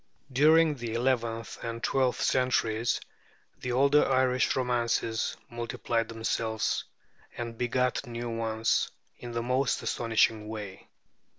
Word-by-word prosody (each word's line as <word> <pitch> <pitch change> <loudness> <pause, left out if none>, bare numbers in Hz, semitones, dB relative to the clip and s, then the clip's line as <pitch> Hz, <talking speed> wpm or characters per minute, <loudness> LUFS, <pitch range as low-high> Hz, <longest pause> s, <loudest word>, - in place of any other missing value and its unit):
During 155 +3 +5
the 120 -4 -5
eleventh 115 -2 -1
and 115 0 -5
twelfth 130 -2 +1
centuries, 120 -3 +1 0.6
the 125 - -3
older 140 +4 +4
Irish 130 -1 +2
romances 120 -3 0
multiplied 115 -1 -2
themselves 110 -1 -1 0.5
and 115 -1 -4
begat 125 +2 0
new 120 0 -4
ones 110 0 +1 0.3
in 120 -1 -7
the 115 0 -1
most 130 +2 0
astonishing 110 -2 +1
way. 105 -3 -7
120 Hz, 110 wpm, -29 LUFS, 115-125 Hz, 0.6 s, During